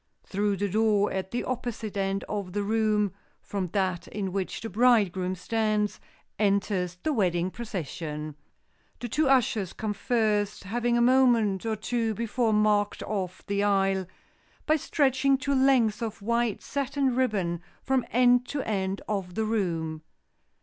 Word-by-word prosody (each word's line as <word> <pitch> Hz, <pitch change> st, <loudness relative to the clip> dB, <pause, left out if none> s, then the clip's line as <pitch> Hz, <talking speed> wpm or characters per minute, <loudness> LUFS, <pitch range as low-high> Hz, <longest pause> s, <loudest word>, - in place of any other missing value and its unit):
Through 200 Hz, 0 st, -1 dB
the 205 Hz, +2 st, 0 dB
door 210 Hz, 0 st, +2 dB
at 190 Hz, 0 st, -3 dB
the 240 Hz, -, -2 dB
opposite 235 Hz, -4 st, -4 dB
end 195 Hz, 0 st, -1 dB
of 200 Hz, -4 st, -4 dB
the 205 Hz, -, -1 dB
room 210 Hz, -2 st, +1 dB, 0.3 s
from 195 Hz, -3 st, -3 dB
that 185 Hz, -1 st, -1 dB
in 195 Hz, -2 st, -4 dB
which 195 Hz, -2 st, -3 dB
the 225 Hz, -, -4 dB
bridegroom 200 Hz, -5 st, +2 dB
stands, 215 Hz, +2 st, 0 dB, 0.4 s
enters 195 Hz, -3 st, +1 dB
the 310 Hz, -, +1 dB
wedding 180 Hz, -5 st, +1 dB
procession. 155 Hz, -, -5 dB, 0.7 s
The 240 Hz, -, -4 dB
two 290 Hz, +5 st, +1 dB
ushers 225 Hz, -8 st, +2 dB
come 215 Hz, -1 st, -3 dB
first, 210 Hz, -1 st, 0 dB
having 240 Hz, +4 st, 0 dB
a -, -, +3 dB
moment 235 Hz, -5 st, +3 dB
or 220 Hz, -, 0 dB
two 225 Hz, 0 st, -1 dB
before 235 Hz, +1 st, 0 dB
marked 210 Hz, -1 st, +2 dB
off 185 Hz, -3 st, -4 dB
the 200 Hz, 0 st, 0 dB
aisle, 195 Hz, -2 st, +2 dB, 0.6 s
by 310 Hz, -, +4 dB
stretching 275 Hz, -3 st, +2 dB
two 280 Hz, +1 st, -1 dB
lengths 260 Hz, -5 st, +3 dB
of 225 Hz, -2 st, -4 dB
white 235 Hz, 0 st, 0 dB
satin 275 Hz, -2 st, -1 dB
ribbon 195 Hz, -10 st, 0 dB, 0.2 s
from 265 Hz, -2 st, +1 dB
end 245 Hz, +1 st, +4 dB
to 285 Hz, -2 st, -3 dB
end 195 Hz, -2 st, -2 dB
of 195 Hz, -4 st, -3 dB
the 220 Hz, 0 st, 0 dB
room. 165 Hz, -8 st, -1 dB
210 Hz, 150 wpm, -27 LUFS, 195-240 Hz, 0.7 s, by